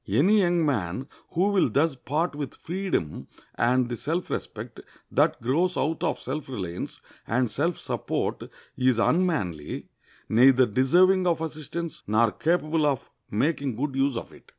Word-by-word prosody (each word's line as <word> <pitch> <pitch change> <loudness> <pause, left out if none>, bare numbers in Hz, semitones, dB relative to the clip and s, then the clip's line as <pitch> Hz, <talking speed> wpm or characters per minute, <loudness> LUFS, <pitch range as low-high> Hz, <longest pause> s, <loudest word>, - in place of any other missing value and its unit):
Any 200 +9 +4
young 175 -3 +2
man 115 - -1 0.3
who 185 +4 +2
will 200 -2 +3
thus 155 +2 +2
part 150 +6 -2
with 145 -2 -5
freedom 175 - -3 0.3
and 125 +1 +2
the 120 - -3
self 165 +9 -3
respect - - -5 0.3
that - - +2
grows 165 +9 +1
out 160 +4 0
of 165 - 0
self 150 -3 -5
reliance 95 -9 -5 0.3
and 120 +1 +1
self 165 +4 0
support - - -3 0.3
is 130 -2 +2
unmanly, 115 - 0 0.4
neither 130 +3 +6
deserving 180 - +4
of 170 -2 +2
assistance 160 +1 -5
nor 110 +2 +3
capable 155 - +1
of 135 -4 -2 0.2
making 140 +2 0
good 135 +3 -2
use 135 -2 +1
of - - -7
it. - - -18
145 Hz, 150 wpm, -26 LUFS, 125-170 Hz, 0.4 s, neither